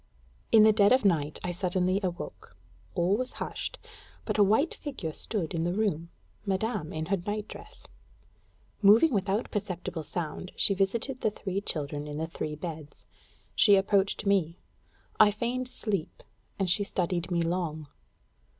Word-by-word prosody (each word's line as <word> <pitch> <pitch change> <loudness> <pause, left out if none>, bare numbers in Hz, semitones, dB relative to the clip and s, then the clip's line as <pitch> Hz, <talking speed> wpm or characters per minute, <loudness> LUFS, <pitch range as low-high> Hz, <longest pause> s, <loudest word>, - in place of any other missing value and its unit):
In 220 -1 +8
the 215 0 +7
dead 205 -1 +5
of 255 -3 +4
night 155 -6 +2
I 180 - -1
suddenly 185 +1 0
awoke. 180 -2 -6 0.4
All 180 +3 +2
was 255 +1 -3
hushed, - - -4 0.5
but - - -1
a - - +8
white 220 - +3
figure 225 - -5
stood 190 -4 -3
in 165 -1 -1
the 175 +2 0
room 185 -6 0 0.3
Madame 195 -4 -1
in 155 0 -3
her 195 +4 +1
night 205 +4 -4
dress. 430 +4 -11 1.0
Moving 225 +9 +6
without 200 +2 0
perceptible 180 -4 -3
sound, 170 +3 -5
she 200 - +3
visited 225 +7 -1
the - - +3
three 195 -2 -4
children 145 -4 -3
in 145 0 -5
the 160 - -1
three 155 -2 -4
beds; 155 -2 -8 0.5
she 205 -2 +6
approached 195 +1 +2
me; 185 -5 +2 0.6
I 215 - +8
feigned 240 +4 -2
sleep, 200 -9 -3 0.3
and 195 - 0
she 195 +4 +3
studied 180 -3 -1
me 170 -2 +1
long. 165 -3 -2
190 Hz, 155 wpm, -29 LUFS, 170-210 Hz, 1.0 s, In